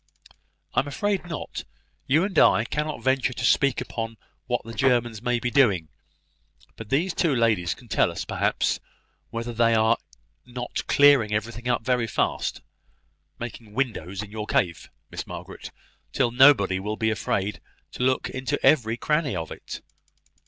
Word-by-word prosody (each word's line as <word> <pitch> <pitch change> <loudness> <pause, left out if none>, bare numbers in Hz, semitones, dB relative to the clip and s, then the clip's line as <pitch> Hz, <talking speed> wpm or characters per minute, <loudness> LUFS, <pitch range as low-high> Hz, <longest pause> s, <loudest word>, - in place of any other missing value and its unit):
"I - - +3
am 145 - -1
afraid 200 +4 -1
not. 165 - -5 0.4
You 150 +6 +4
and 190 -4 +1
I 110 - +5
cannot 150 +3 -3
venture 130 -1 +1
to - - -3
speak 140 -3 +3
upon 115 -1 -5 0.3
what - - -1
the 115 - -8
Germans 120 -4 +1
may 120 0 0
be 120 0 -2
doing. 100 - +3 0.9
But 110 -2 -9
these 165 +7 +1
two 165 -4 +1
ladies 110 -8 +1
can - - -17
tell - - +2
us, - - -5
perhaps, - - 0 0.5
whether 115 +1 -4
they 115 0 +3
are 110 +1 +3 0.5
not 125 0 -5
clearing 140 -7 +5
everything 115 +3 -4
up 120 -2 +1
very 125 -2 +1
fast; - - -1 0.8
making 115 -2 -8
windows 105 -7 -2
in 105 - -11
your 105 0 -5
cave, 85 -8 0 0.2
Miss - - -6
Margaret, - - -8 0.4
till 125 -3 +1
nobody 120 -7 +5
will 105 +3 -4
be 110 -1 +1
afraid 100 0 -2 0.3
to - - -8
look 130 +1 +1
into 130 -2 -3
every 115 -6 +4
cranny 150 - 0
of 80 -2 -4
it." - - -8
120 Hz, 160 wpm, -25 LUFS, 110-135 Hz, 0.9 s, I